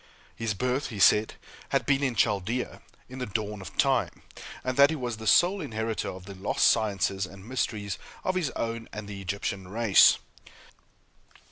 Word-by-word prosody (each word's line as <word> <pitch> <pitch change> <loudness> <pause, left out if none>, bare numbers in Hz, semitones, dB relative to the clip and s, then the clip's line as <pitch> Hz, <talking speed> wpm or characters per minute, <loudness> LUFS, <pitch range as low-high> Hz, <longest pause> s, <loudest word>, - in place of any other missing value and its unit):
His 115 -3 -2
birth, 125 +6 -1
he 110 - -7
said, 105 +2 +4 0.3
had - - +1
been 135 -1 +2
in 130 -4 0
Chaldea, 105 +4 0 0.3
in 130 +1 -9
the 125 - -3
dawn 105 0 -3
of 95 - -10
time; - - +1 0.4
and 130 0 -2
that 140 +1 +7
he 160 - -1
was 120 -5 -4
the 110 0 -7
sole 185 - +4
inheritor 110 -5 -3
of 90 0 -9
the 100 - -8
lost 95 +1 0
sciences 100 -3 +1
and 95 +2 -13
mysteries 105 -6 -2 0.2
of 185 - 0
his 180 -6 0
own 115 0 -3
and 105 -1 -7
the 100 -1 -7
Egyptian 95 0 -4
race. 110 +1 +5
110 Hz, 170 wpm, -27 LUFS, 100-125 Hz, 0.4 s, that